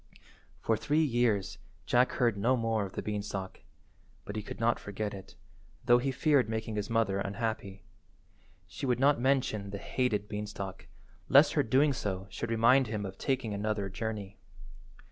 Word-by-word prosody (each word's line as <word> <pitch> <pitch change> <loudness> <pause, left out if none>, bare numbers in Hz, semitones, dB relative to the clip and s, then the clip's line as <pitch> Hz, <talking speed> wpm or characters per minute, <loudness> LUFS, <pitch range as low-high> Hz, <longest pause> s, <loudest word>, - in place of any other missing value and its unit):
For 115 - +2
three 150 +8 +1
years 120 -8 +1 0.3
Jack 125 +1 +3
heard 120 -4 +2
no 120 +6 +2
more 115 -3 0
of 95 - -15
the - - -4
beanstalk, 100 -2 -4 0.6
but 100 - -6
he 110 - -2
could 105 - -8
not 115 0 +2
forget 105 +1 -4
it, 95 -1 -10 0.5
though 120 0 +6
he 135 +2 -1
feared 135 -3 +2
making 110 0 -3
his 105 -1 -3
mother 115 -4 +1
unhappy. 100 -1 -3 0.8
She 135 - -6
would 125 -1 +1
not 140 -2 +4
mention 125 -6 +1
the 100 - -5
hated 110 -2 -1
beanstalk, 105 -2 -6 0.4
lest - - +6
her - - +3
doing 140 +5 +3
so 95 -5 -3
should 115 - -4
remind 115 +3 +4
him 105 -2 -3
of 95 0 -8
taking 130 -5 -1
another 100 -1 -2
journey. 105 0 -5
110 Hz, 165 wpm, -30 LUFS, 100-120 Hz, 0.8 s, though